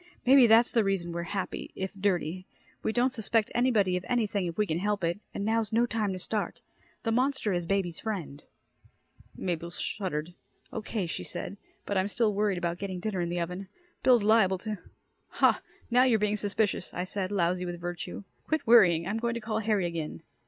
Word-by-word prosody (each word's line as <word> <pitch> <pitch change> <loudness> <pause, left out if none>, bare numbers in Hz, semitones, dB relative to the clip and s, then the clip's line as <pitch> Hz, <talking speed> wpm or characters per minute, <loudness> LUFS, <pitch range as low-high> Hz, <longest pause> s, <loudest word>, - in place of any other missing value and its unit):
Maybe 260 -1 +8
that's 230 +2 +6
the 230 - +3
reason 195 -3 -1
we're 170 0 -3
happy 195 -2 -3
if 190 +1 -4
dirty. 185 -2 -1 0.3
We - - 0
don't 245 +3 +2
suspect 220 -1 0
anybody 225 -7 +3
of 180 - -3
anything 210 -6 +1
if 170 - -5
we 210 - +3
can 160 -3 -1
help 205 0 -1
it 170 +4 0
and 200 - -4
now's 225 -1 +1
no 230 +2 +3
time 220 -4 -1
to - - -4
start. 210 +3 -2 0.4
The 225 - 0
monster 255 -3 +1
is 175 -1 -1
baby's 190 -4 0
friend." 175 -10 -4 1.0
Mabel 170 -2 -2
shuddered. 170 -1 -3 0.4
"Okay," 220 -3 -2
she 165 - -4
said. 195 - -6 0.3
"But 200 -2 0
I'm 190 - +1
still 215 +1 +1
worried 205 -2 +1
about 175 0 -2
getting 190 -2 -4
dinner 195 -1 -2
in 170 - -1
the 175 0 -1
oven. 180 +3 -4 0.3
Bill's 245 -4 +5
liable 205 -3 +4
to 215 -3 -3 0.3
" - - -46
"Hah, - - +5 0.3
now 250 +1 +6
you're 250 -4 +4
being 210 0 +1
suspicious," 205 -2 -1
I 180 - -1
said, 185 +1 -3
lousy 180 -1 +1
with 175 -1 -5
virtue. 175 +3 -5 0.2
"Quit 315 -2 0
worrying. 180 -8 +6
I'm 215 +3 -1
going 235 0 -1
to - - -2
call 220 -1 -2
Harry 210 -4 +1
again." 165 -3 -4
200 Hz, 195 wpm, -29 LUFS, 175-220 Hz, 1.0 s, Maybe